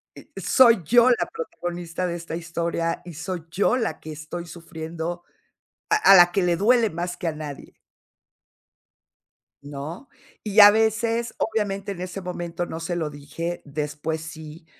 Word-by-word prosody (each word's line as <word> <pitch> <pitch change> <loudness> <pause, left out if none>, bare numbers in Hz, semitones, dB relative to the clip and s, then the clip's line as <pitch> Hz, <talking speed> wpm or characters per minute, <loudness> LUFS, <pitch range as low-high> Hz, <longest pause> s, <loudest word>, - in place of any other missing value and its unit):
y - - -13 0.2
soy 235 -7 +5
yo 240 +8 +5
la 240 - +2
protagonista 175 - -5
de 175 -1 -2
esta 170 -1 -6
historia 170 0 -2
y 175 - -8
soy 165 +2 -5
yo 200 +8 +2
la 230 -3 -2
que 155 - -9
estoy 155 +3 -7
sufriendo 170 0 -6 0.7
a 425 - +4
a 425 - +7
la 175 -1 +7
que 195 - +1
le 175 -1 +2
duele 225 +3 +3
más 175 +1 -4
que 175 - -3
a - - -1
nadie 150 -2 -9 1.9
¿no? 145 - -8 0.3
Y 210 0 +2
a 205 0 +11
veces, 225 +2 0
obviamente, 205 -2 -2
en 180 -3 -7
ese 185 +1 -5
momento 175 -1 -4
no 165 - -6
se 165 +1 -3
lo 155 -3 -2
dije, 165 +4 -5
después 150 +2 -4
sí. 160 0 -10
175 Hz, 160 wpm, -24 LUFS, 160-205 Hz, 1.9 s, a